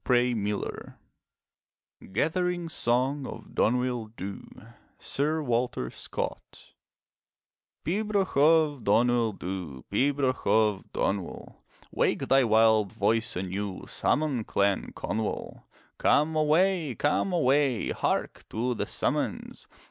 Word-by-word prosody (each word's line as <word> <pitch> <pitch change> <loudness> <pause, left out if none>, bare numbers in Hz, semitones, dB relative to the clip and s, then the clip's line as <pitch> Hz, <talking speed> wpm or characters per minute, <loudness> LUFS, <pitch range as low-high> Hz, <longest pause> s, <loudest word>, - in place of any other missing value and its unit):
\ 120 -5 -4
GATHERING 175 - 0
SONG 130 0 0
OF - - -10
DONUIL 125 -2 0
DHU 95 +1 -7 0.5
Sir 155 +3 -1
Walter 120 - -1
Scott - - -6 1.1
Pibroch 200 +1 0
of 150 -2 +4
Donuil 115 +1 +3
Dhu, 90 -9 -6
Pibroch 135 -1 +1
of 105 -3 +2
Donuil, 95 -3 -3 0.4
Wake - - 0
thy 135 0 +5
wild 110 -2 +4
voice 110 +3 0
anew. 95 +2 -4
Summon 145 -6 0
Clan 100 -1 0
Conuil. 110 0 -4 0.3
Come 155 +2 +3
away, 155 -1 +2
come 150 +6 +1
away, 140 -6 +2
Hark - - -2
to 120 +3 -1
the - - -3
summons! - - -2
125 Hz, 95 wpm, -28 LUFS, 105-150 Hz, 1.1 s, thy